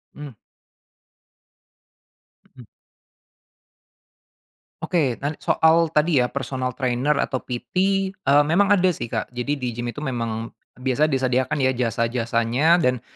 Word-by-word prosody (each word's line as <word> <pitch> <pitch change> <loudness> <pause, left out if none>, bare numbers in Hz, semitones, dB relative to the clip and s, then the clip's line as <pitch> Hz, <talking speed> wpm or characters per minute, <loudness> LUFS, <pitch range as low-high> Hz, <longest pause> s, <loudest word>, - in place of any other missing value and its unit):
Mmm. 145 -6 -10 2.2
Mhm. 125 -4 -14 2.2
Oke. 150 -10 0
Nan 145 +2 -3
soal 165 +1 +3
tadi 150 -2 +2
ya 125 - 0
personal 130 -2 -3
trainer 130 +3 0
atau 130 - -1
PT, 125 -1 -7 0.4
eee, 145 -6 +3
memang 185 +6 +2
ada 185 -3 +4
sih, 120 - -6
Kak. 110 +2 -4
Jadi 125 +4 -2
di 125 -3 -4
gim 120 +1 -4
itu 145 - -7
memang 115 -3 -4 0.2
biasa 130 +4 +1
disediakan 130 -1 0
ya 130 -2 +2
jasa-jasanya 120 +5 +1
dan 125 -7 0
130 Hz, 120 wpm, -22 LUFS, 120-150 Hz, 2.2 s, ada